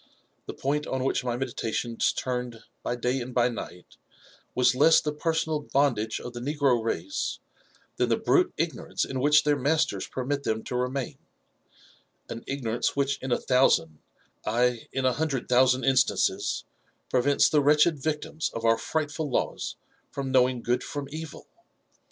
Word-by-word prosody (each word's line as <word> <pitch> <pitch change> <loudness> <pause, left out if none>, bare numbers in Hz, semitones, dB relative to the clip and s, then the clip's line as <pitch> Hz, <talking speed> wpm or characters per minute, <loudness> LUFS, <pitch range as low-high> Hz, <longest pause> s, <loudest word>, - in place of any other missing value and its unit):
The - - -6
point 150 +2 -1
on 130 -1 -2
which 135 - 0
my 120 -1 -2
meditations 120 -2 -1
turned 125 -3 -4 0.2
by 120 - -2
day 125 +2 -1
and 125 +1 -7
by 120 0 +3
night, 90 -6 -9 0.6
was 125 0 +4
less 155 +5 +6
the 150 - -3
personal 160 0 -1
bondage 135 -7 0
of 125 - -8
the 120 - -6
negro 135 -3 +1
race, 95 -4 -2 0.6
than - - +1
the - - +3
brute - - +2
ignorance - - -2
in 130 - -4
which 150 +3 +5
their 145 -1 +2
masters 140 -8 +1
permit 140 +2 -2
them 110 -4 -2
to - - -5
remain; 125 +1 -2 1.1
an 115 - -6
ignorance 120 -4 -1
which 140 0 0
in 130 - -4
a 120 - +3
thousand 105 - +2 0.3
— - - -44
ay, 120 +1 +1
in 135 -1 -2
a 130 - +3
hundred 145 -4 -2
thousand 130 +1 +4
instances 130 -2 +1 0.2
— - - -42
prevents 135 +3 +4
the 150 - +3
wretched 150 +2 +4
victims 155 +1 -2
of 115 0 -3
our 115 0 +4
frightful 155 -1 -2
laws 125 - -2 0.3
from 135 -1 -4
knowing 125 -2 +3
good 125 +1 0
from 145 -1 -5
evil. 160 +1 -7
130 Hz, 165 wpm, -27 LUFS, 120-145 Hz, 1.1 s, less